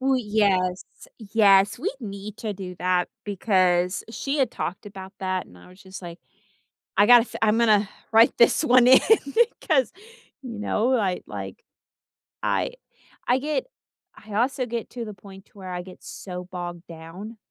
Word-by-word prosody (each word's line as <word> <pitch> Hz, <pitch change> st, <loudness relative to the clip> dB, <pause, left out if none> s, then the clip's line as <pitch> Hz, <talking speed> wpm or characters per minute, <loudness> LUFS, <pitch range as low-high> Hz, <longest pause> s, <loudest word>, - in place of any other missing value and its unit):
We 265 Hz, -1 st, +2 dB
yes, 195 Hz, -4 st, +1 dB, 0.3 s
yes 205 Hz, -1 st, +3 dB
we 380 Hz, -, -2 dB
need 205 Hz, -1 st, -7 dB
to 215 Hz, -2 st, -3 dB
do 185 Hz, -2 st, -8 dB
that 180 Hz, -1 st, +1 dB, 0.2 s
because 185 Hz, -3 st, +1 dB
she 275 Hz, +5 st, -3 dB
had 260 Hz, -4 st, +2 dB
talked 180 Hz, -, -5 dB
about 190 Hz, -1 st, -10 dB
that 185 Hz, -1 st, -2 dB
and 90 Hz, -, -18 dB
I 90 Hz, -, -16 dB
was 185 Hz, +1 st, -18 dB
just, 190 Hz, 0 st, -11 dB
like, 170 Hz, -1 st, -9 dB, 0.8 s
"I 205 Hz, -, +6 dB
gotta 245 Hz, -1 st, +9 dB
f -, -, -13 dB
I'm 220 Hz, 0 st, +3 dB
gonna 215 Hz, -3 st, +3 dB, 0.2 s
write 225 Hz, +1 st, +5 dB
this 235 Hz, +6 st, +4 dB
1 250 Hz, -3 st, +5 dB
in 260 Hz, +1 st, +8 dB, 0.6 s
'cause," 270 Hz, -, +1 dB, 0.5 s
you 235 Hz, -5 st, -8 dB
know, 230 Hz, +4 st, 0 dB
I 195 Hz, -6 st, -1 dB
like, -, -, -8 dB, 0.8 s
I -, -, -1 dB, 0.5 s
I 250 Hz, -, +3 dB
get 295 Hz, -1 st, -2 dB, 0.5 s
I 215 Hz, -1 st, -12 dB
also 255 Hz, +3 st, 0 dB
get 235 Hz, -1 st, -5 dB
to 235 Hz, -1 st, -6 dB
the 210 Hz, -, -7 dB
point 195 Hz, 0 st, -14 dB
to -, -, -24 dB
where 185 Hz, -1 st, -9 dB
I 180 Hz, -, -4 dB
get 185 Hz, 0 st, -14 dB
so 180 Hz, -1 st, -8 dB
bogged 175 Hz, -1 st, -7 dB
down 170 Hz, +7 st, -10 dB
205 Hz, 170 wpm, -24 LUFS, 185-235 Hz, 0.8 s, gotta